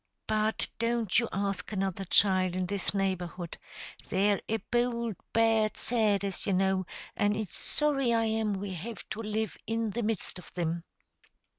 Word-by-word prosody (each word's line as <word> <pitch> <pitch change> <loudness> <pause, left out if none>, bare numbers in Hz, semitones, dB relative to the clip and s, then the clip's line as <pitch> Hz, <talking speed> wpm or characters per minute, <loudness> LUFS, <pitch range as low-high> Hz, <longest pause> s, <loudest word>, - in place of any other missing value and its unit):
But 215 0 +1
don't 230 -3 +2
you 235 - -1
ask 200 +1 -2
another 195 -1 -1
child 185 -1 +4
in 185 0 0
this 200 +1 -1
neighborhood; 180 -3 -2 0.5
they're 200 +1 +3
a 225 - +2
bould, 235 -2 +1 0.2
bad 225 -1 +3
set, 215 -4 +2
as 195 0 -3
you 195 - +2
know, 190 0 +2 0.3
and 205 0 +2
it's 215 -4 -4
sorry 275 -5 +1
I 230 -1 +3
am 220 -1 +1
we 195 0 -4
have 205 +6 -6
to 220 - -4
live 220 0 -2
in 225 -1 0
the 235 - -2
midst 215 -4 -1
of - - -12
thim." 170 -1 -2
210 Hz, 160 wpm, -30 LUFS, 190-225 Hz, 0.5 s, child